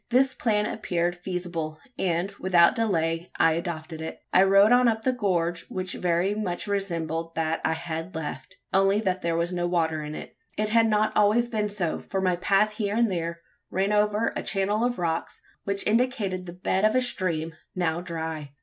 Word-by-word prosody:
This 265 Hz, +2 st, +4 dB
plan 210 Hz, -4 st, +1 dB
appeared 175 Hz, -5 st, -1 dB
feasible; 175 Hz, -3 st, -4 dB, 0.2 s
and, 180 Hz, 0 st, 0 dB
without 175 Hz, -2 st, +5 dB
delay, 170 Hz, -7 st, 0 dB
I 165 Hz, -, +5 dB
adopted 160 Hz, -1 st, -4 dB
it. 160 Hz, -, -6 dB
I 185 Hz, -, +7 dB
rode 195 Hz, +3 st, +6 dB
on 250 Hz, 0 st, +6 dB
up 220 Hz, -1 st, +1 dB
the 260 Hz, -, +2 dB
gorge, 175 Hz, -7 st, -1 dB
which 185 Hz, -1 st, -3 dB
very 180 Hz, +3 st, +1 dB
much 190 Hz, -5 st, -3 dB
resembled 165 Hz, -5 st, -2 dB
that 160 Hz, 0 st, 0 dB
I 160 Hz, -, +2 dB
had 165 Hz, +1 st, -5 dB
left 150 Hz, -4 st, -6 dB, 0.2 s
only 195 Hz, +1 st, +4 dB
that 185 Hz, -3 st, -1 dB
there 170 Hz, -1 st, 0 dB
was 170 Hz, +2 st, -1 dB
no 175 Hz, -1 st, 0 dB
water 160 Hz, -3 st, 0 dB
in 150 Hz, 0 st, -6 dB
it. -, -, -9 dB, 0.2 s
It 215 Hz, 0 st, 0 dB
had 225 Hz, +1 st, +4 dB
not 215 Hz, 0 st, +2 dB
been -, -, +4 dB
always 210 Hz, -1 st, +1 dB
so: 175 Hz, -5 st, -1 dB
for 195 Hz, -, -4 dB
my 185 Hz, -2 st, +2 dB
path 200 Hz, +4 st, +3 dB
here 210 Hz, -1 st, -2 dB
and 230 Hz, -2 st, +2 dB
there 170 Hz, -1 st, -3 dB, 0.3 s
ran 195 Hz, +3 st, 0 dB
over 210 Hz, +2 st, +2 dB
a -, -, -2 dB
channel 205 Hz, +2 st, 0 dB
of 245 Hz, 0 st, 0 dB
rocks, 165 Hz, -2 st, -2 dB, 0.3 s
which 200 Hz, 0 st, -1 dB
indicated 210 Hz, -6 st, 0 dB
the 175 Hz, -, -7 dB
bed 185 Hz, +2 st, -1 dB
of 215 Hz, +2 st, +4 dB
a 255 Hz, -, +4 dB
stream, 165 Hz, -9 st, -2 dB, 0.2 s
now 170 Hz, -2 st, 0 dB
dry. 160 Hz, -4 st, -5 dB
185 Hz, 190 wpm, -26 LUFS, 165-210 Hz, 0.3 s, I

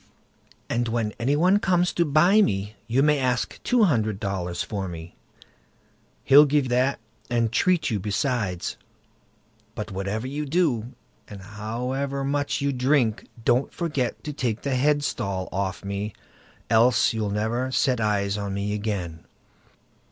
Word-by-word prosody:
"And 120 Hz, 0 st, -1 dB
when 115 Hz, -2 st, -1 dB
any 130 Hz, +5 st, +1 dB
one 180 Hz, +6 st, +4 dB
comes 180 Hz, -2 st, +1 dB
to 170 Hz, -, +2 dB
buy 175 Hz, +8 st, +5 dB
me, 100 Hz, -, 0 dB
you 125 Hz, +5 st, +2 dB
may 150 Hz, -1 st, +3 dB
ask 125 Hz, -2 st, -1 dB
two 245 Hz, -2 st, +3 dB
hundred 110 Hz, -, +1 dB
dollars 90 Hz, -4 st, -3 dB
for 100 Hz, -3 st, -4 dB
me—he'll 85 Hz, -, -1 dB
give 145 Hz, -2 st, +1 dB
that 130 Hz, +3 st, +2 dB, 0.3 s
and 115 Hz, -2 st, +1 dB
treat 175 Hz, +1 st, +2 dB
you 105 Hz, -, 0 dB
besides; 105 Hz, -, -2 dB, 1.0 s
but 105 Hz, 0 st, -5 dB
whatever 100 Hz, +4 st, -3 dB
you 145 Hz, +3 st, -4 dB
do, 135 Hz, -7 st, 0 dB, 0.3 s
and 100 Hz, -2 st, -10 dB
however 125 Hz, +7 st, -3 dB
much 145 Hz, +1 st, -1 dB
you 140 Hz, 0 st, 0 dB
drink, 125 Hz, -3 st, +1 dB, 0.2 s
don't 125 Hz, +3 st, +2 dB
forget 145 Hz, -8 st, -2 dB
to 150 Hz, -, -5 dB
take 120 Hz, -6 st, -2 dB
the 140 Hz, -, -1 dB
headstall 125 Hz, -9 st, 0 dB
off 95 Hz, 0 st, -3 dB
me, 100 Hz, +1 st, -3 dB, 0.5 s
else 115 Hz, +1 st, +4 dB
you'll 110 Hz, -2 st, -2 dB
never 115 Hz, +5 st, -1 dB
set 130 Hz, -3 st, +1 dB
eyes 105 Hz, -1 st, 0 dB
on 100 Hz, -1 st, -3 dB
me 100 Hz, +1 st, -2 dB
again." 100 Hz, -6 st, -4 dB
120 Hz, 140 wpm, -25 LUFS, 105-140 Hz, 1.0 s, buy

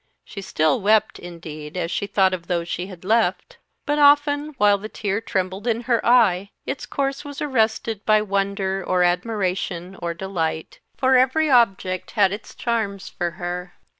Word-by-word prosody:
She 200 Hz, -, -8 dB
still 155 Hz, -5 st, +1 dB
wept, 215 Hz, +2 st, +2 dB
indeed, 165 Hz, -2 st, -9 dB
as 170 Hz, -1 st, -2 dB
she 200 Hz, -, -2 dB
thought 190 Hz, -2 st, +2 dB
of 175 Hz, -2 st, -5 dB
those 170 Hz, -2 st, -1 dB
she 175 Hz, +2 st, -4 dB
had 185 Hz, -2 st, -12 dB
left; 200 Hz, -4 st, 0 dB, 0.3 s
but 295 Hz, 0 st, 0 dB
often, 290 Hz, +1 st, +4 dB
while 205 Hz, -2 st, +4 dB
the 215 Hz, +2 st, -7 dB
tear 205 Hz, 0 st, -2 dB
trembled 190 Hz, +1 st, -3 dB
in 230 Hz, 0 st, +1 dB
her 235 Hz, -2 st, 0 dB
eye, 200 Hz, -6 st, +4 dB, 0.2 s
its 270 Hz, -, -4 dB
course 275 Hz, -1 st, -2 dB
was 285 Hz, -1 st, -8 dB
arrested 225 Hz, -5 st, 0 dB
by 215 Hz, -1 st, +3 dB
wonder, 195 Hz, -1 st, -1 dB
or 180 Hz, 0 st, +1 dB
admiration, 180 Hz, -1 st, -1 dB
or 170 Hz, 0 st, -3 dB
delight; 165 Hz, -4 st, -3 dB, 0.2 s
for 260 Hz, 0 st, +4 dB
every 275 Hz, +4 st, +3 dB
object 195 Hz, -7 st, +2 dB
had 200 Hz, -2 st, +5 dB
its 210 Hz, -, -9 dB
charms 220 Hz, -5 st, -2 dB
for 175 Hz, -1 st, -2 dB
her. 180 Hz, +1 st, -5 dB
200 Hz, 165 wpm, -22 LUFS, 180-230 Hz, 0.3 s, had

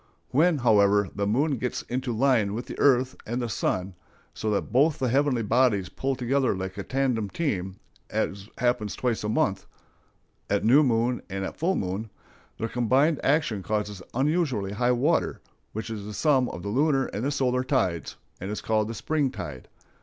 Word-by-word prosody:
When, 160 Hz, +4 st, +4 dB
however, 105 Hz, -5 st, +4 dB
the 100 Hz, 0 st, -1 dB
moon 135 Hz, +6 st, +1 dB
gets 125 Hz, +1 st, -3 dB
into 130 Hz, 0 st, -3 dB
line 115 Hz, -4 st, +2 dB
with 120 Hz, -, -4 dB
the -, -, -8 dB
earth 130 Hz, -2 st, +3 dB
and 120 Hz, +3 st, -3 dB
the 120 Hz, -, -2 dB
sun, 95 Hz, -2 st, -1 dB, 0.4 s
so 110 Hz, -, -3 dB
that 105 Hz, -, -1 dB
both 145 Hz, +5 st, +3 dB
the 130 Hz, -1 st, 0 dB
heavenly 135 Hz, -2 st, +2 dB
bodies 110 Hz, -4 st, +2 dB
pull 135 Hz, 0 st, -2 dB
together 130 Hz, -1 st, +1 dB
like 95 Hz, 0 st, -5 dB
a -, -, -1 dB
tandem 125 Hz, -3 st, -1 dB
team, 95 Hz, -, -2 dB, 0.3 s
as 100 Hz, +2 st, -2 dB
happens 120 Hz, -4 st, 0 dB
twice 120 Hz, -4 st, -1 dB
a 105 Hz, -, -1 dB
month,—at 100 Hz, 0 st, -4 dB
new 130 Hz, +7 st, +7 dB
moon 120 Hz, -2 st, +1 dB
and 95 Hz, 0 st, -4 dB
full 185 Hz, +4 st, 0 dB
moon,—their 105 Hz, -, -6 dB
combined 130 Hz, +7 st, +2 dB
action 140 Hz, -8 st, +1 dB
causes 105 Hz, -1 st, -2 dB
unusually 135 Hz, -, 0 dB
high 120 Hz, +4 st, +1 dB
water, 140 Hz, +7 st, +1 dB, 0.3 s
which 110 Hz, +2 st, -5 dB
is 105 Hz, -2 st, -5 dB
the 105 Hz, 0 st, -7 dB
sum 135 Hz, -5 st, +3 dB
of 85 Hz, -, -7 dB
the 100 Hz, -, -3 dB
lunar 135 Hz, +3 st, +2 dB
and 120 Hz, +8 st, -2 dB
solar 130 Hz, -3 st, +1 dB
tides, 95 Hz, -, -1 dB, 0.2 s
and 95 Hz, -, -5 dB
is 105 Hz, -, -3 dB
called 110 Hz, -1 st, +1 dB
the 115 Hz, -, -5 dB
spring 150 Hz, +2 st, 0 dB
tide. 70 Hz, -, -7 dB
120 Hz, 170 wpm, -26 LUFS, 105-135 Hz, 0.4 s, new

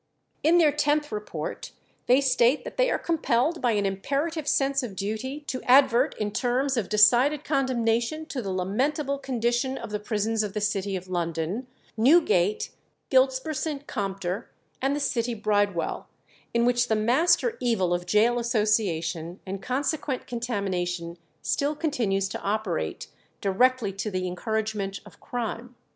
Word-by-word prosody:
In 330 Hz, +3 st, +4 dB
their 320 Hz, -4 st, +5 dB
tenth 295 Hz, 0 st, +1 dB
report -, -, -5 dB, 0.3 s
they 255 Hz, +3 st, +5 dB
state 260 Hz, 0 st, +3 dB
that -, -, -8 dB
they -, -, +3 dB
are -, -, +1 dB
compelled 320 Hz, -1 st, 0 dB
by 240 Hz, -2 st, +2 dB
an 205 Hz, -1 st, +1 dB
imperative 280 Hz, -, -2 dB
sense 275 Hz, 0 st, +2 dB
of 230 Hz, -7 st, -6 dB
duty 220 Hz, +9 st, -4 dB
to 265 Hz, -3 st, -5 dB
advert 260 Hz, 0 st, +5 dB
in 210 Hz, -1 st, -2 dB
terms 260 Hz, +4 st, 0 dB
of 230 Hz, -6 st, -1 dB
decided 240 Hz, +8 st, +5 dB
condemnation 260 Hz, +1 st, 0 dB
to 275 Hz, -5 st, -4 dB
the 200 Hz, -, -5 dB
lamentable 265 Hz, -, -1 dB
condition 250 Hz, 0 st, -1 dB
of -, -, -7 dB
the 210 Hz, -, -2 dB
prisons 215 Hz, +1 st, -1 dB
of 210 Hz, -2 st, -3 dB
the -, -, 0 dB
city 205 Hz, -1 st, -1 dB
of 185 Hz, 0 st, -6 dB
London, 175 Hz, +6 st, -2 dB, 0.3 s
Newgate, 220 Hz, -, +3 dB, 0.4 s
Giltspur 260 Hz, +3 st, +3 dB
St. 290 Hz, -1 st, -3 dB
Compter, 195 Hz, -2 st, -3 dB, 0.3 s
and 270 Hz, +2 st, +1 dB
the -, -, -2 dB
City 240 Hz, -4 st, -1 dB
Bridewell, 205 Hz, -4 st, 0 dB, 0.4 s
in 235 Hz, 0 st, +2 dB
which 245 Hz, 0 st, +2 dB
the 220 Hz, -, +2 dB
master 305 Hz, -, +3 dB
evil 205 Hz, -8 st, +1 dB
of 175 Hz, 0 st, -2 dB
gaol 235 Hz, +3 st, +4 dB
association 195 Hz, -7 st, 0 dB
and 195 Hz, 0 st, -5 dB
consequent 270 Hz, +1 st, -2 dB
contamination 180 Hz, -8 st, -3 dB, 0.2 s
still 290 Hz, +2 st, 0 dB
continues 230 Hz, -, 0 dB
to -, -, -5 dB
operate 200 Hz, -, -2 dB, 0.3 s
directly 220 Hz, +1 st, +2 dB
to 195 Hz, +3 st, -3 dB
the 185 Hz, -2 st, -2 dB
encouragement 205 Hz, +1 st, -2 dB
of -, -, -16 dB
crime. 245 Hz, 0 st, -5 dB
235 Hz, 150 wpm, -26 LUFS, 200-270 Hz, 0.4 s, their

